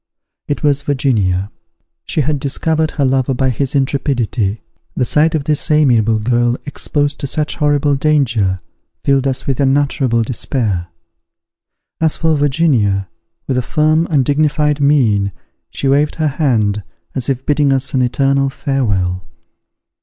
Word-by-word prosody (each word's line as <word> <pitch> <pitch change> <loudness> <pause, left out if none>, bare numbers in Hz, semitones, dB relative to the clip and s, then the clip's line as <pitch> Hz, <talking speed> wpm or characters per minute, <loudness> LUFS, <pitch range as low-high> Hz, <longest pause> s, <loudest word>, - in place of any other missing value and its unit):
It 145 - -3
was 140 -2 +2
Virginia. 110 -9 0 0.5
She 155 - -1
had 145 +1 -1
discovered 155 +3 0
her 145 -3 -1
lover 130 0 +1
by 130 +1 +1
his 135 +4 -2
intrepidity. 130 -6 -1 0.3
The 125 - 0
sight 155 +5 +2
of 150 - -1
this 150 0 +1
amiable 120 -8 +3
girl, 120 +2 +1
exposed 145 0 -2
to 140 - -3
such 150 +2 -2
horrible 145 -1 +2
danger, 120 -11 +1 0.4
filled 135 -1 +2
us 130 -1 -2
with 135 -3 -2
unutterable 135 -3 +1
despair. 110 -6 -2 1.1
As 160 -1 +1
for 160 -1 +1
Virginia, 130 - +1 0.4
with 130 - -1
a - - +2
firm 155 +5 +1
and 140 -6 +2
dignified 150 +1 +1
mien, 110 -9 +2 0.4
she 140 - -3
waved 145 +2 +2
her 155 -2 0
hand, 115 -8 0 0.3
as 130 -1 -3
if 130 -1 -2
bidding 145 -1 +2
us 135 0 0
an 130 - +2
eternal 135 +2 +1
farewell. 100 - -1
135 Hz, 140 wpm, -16 LUFS, 120-145 Hz, 1.1 s, amiable